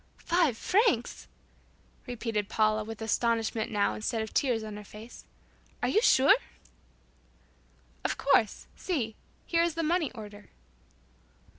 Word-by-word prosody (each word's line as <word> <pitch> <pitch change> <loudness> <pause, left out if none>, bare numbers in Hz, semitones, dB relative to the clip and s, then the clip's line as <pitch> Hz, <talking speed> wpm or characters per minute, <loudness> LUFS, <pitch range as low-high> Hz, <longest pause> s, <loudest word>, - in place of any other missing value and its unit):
"Five 335 -9 +2
francs!" 365 - +1 0.8
repeated 225 -4 -3
Paula, 215 0 +2
with 225 +1 -7
astonishment 225 0 0
now 205 -2 +1
instead 220 +1 -2
of 220 - -8
tears 245 -6 +1
on 215 -1 -7
her 210 - -8
face, 215 +3 -12 0.6
"Are - - +2
you 435 - +3
sure?" 285 - +6 1.7
"Of - - -1
course. 265 -6 +2
See. 245 - -2 0.3
Here 335 -1 +2
is 340 -2 +1
the 330 - -1
money 325 -2 +1
order." 210 -3 -11
230 Hz, 125 wpm, -29 LUFS, 215-305 Hz, 1.7 s, sure